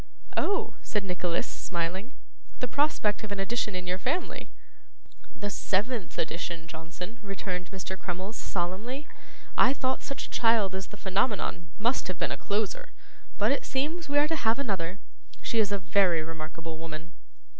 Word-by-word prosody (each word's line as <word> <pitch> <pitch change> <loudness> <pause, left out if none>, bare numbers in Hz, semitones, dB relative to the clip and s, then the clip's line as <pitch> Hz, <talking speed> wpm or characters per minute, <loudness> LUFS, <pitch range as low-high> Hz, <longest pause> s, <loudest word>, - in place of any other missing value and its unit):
'Oh!' 400 - +2
said 210 -2 0
Nicholas, 180 -2 0
smiling. 185 +8 -2 0.5
'The 250 - +1
prospect 250 -7 +2
of 215 - -4
an 200 - -1
addition 210 0 0
to 180 - 0
your 180 +1 -1
family?' 310 - -1 0.9
'The 205 -1 -2
seventh 205 +2 0
addition, 165 0 -1
Johnson,' 170 +7 -6
returned 190 -3 -3
Mr. 190 -1 -4
Crummles, 185 +4 -3
solemnly. 205 +13 -2 0.5
'I 260 - +8
thought 260 -1 +1
such 275 - -3
a - - -9
child 225 -5 +4
as 190 0 -2
the 210 - -10
Phenomenon 190 -4 +1
must 235 +5 +2
have 185 -2 -2
been - - +1
a - - +1
closer; 205 0 0 0.5
but - - +4
it - - +2
seems 300 +4 -1
we 285 - +3
are 295 +1 +6
to 325 - +1
have 225 -4 +3
another. 195 -9 -1 0.5
She 230 - +2
is 205 -2 +4
a 200 - +3
very 180 -3 +4
remarkable 160 0 -5
woman. 165 0 -6
195 Hz, 160 wpm, -30 LUFS, 180-235 Hz, 0.9 s, I